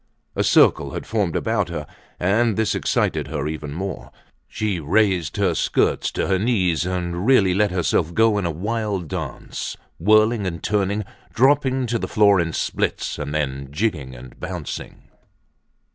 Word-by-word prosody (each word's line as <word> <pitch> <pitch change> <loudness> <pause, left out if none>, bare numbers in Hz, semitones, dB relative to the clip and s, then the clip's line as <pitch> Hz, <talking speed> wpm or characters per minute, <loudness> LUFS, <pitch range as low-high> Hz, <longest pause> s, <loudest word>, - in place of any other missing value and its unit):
A - - +1
circle - - +4
had - - -5
formed 100 -7 -1
about 110 -5 0
her 75 -3 -4 0.3
and 105 +4 +2
this 110 -1 +1
excited - - 0
her 75 -2 -3
even 75 -1 -5
more. 95 +4 -5 0.4
She 105 -4 -2
raised 90 0 +1
her 95 -4 +2
skirts - - +1
to - - -1
her 95 -1 +1
knees 90 - +1
and 90 +1 -2
really 100 -9 +5
let 105 +2 +2
herself 90 -2 0
go 110 -2 +4
in 95 - -2
a - - -1
wild 100 +1 -2
dance, - - -5 0.2
whirling 110 +3 +3
and 85 -2 -5
turning, 105 0 0 0.3
dropping 130 +1 +3
to 120 -1 -1
the - - -3
floor 100 -2 +4
in 85 -1 0
splits, - - -2
and 75 -1 -4
then 70 -3 -2
jigging 75 - -2
and 60 0 -13
bouncing. 90 -4 -6
95 Hz, 160 wpm, -22 LUFS, 80-110 Hz, 0.4 s, really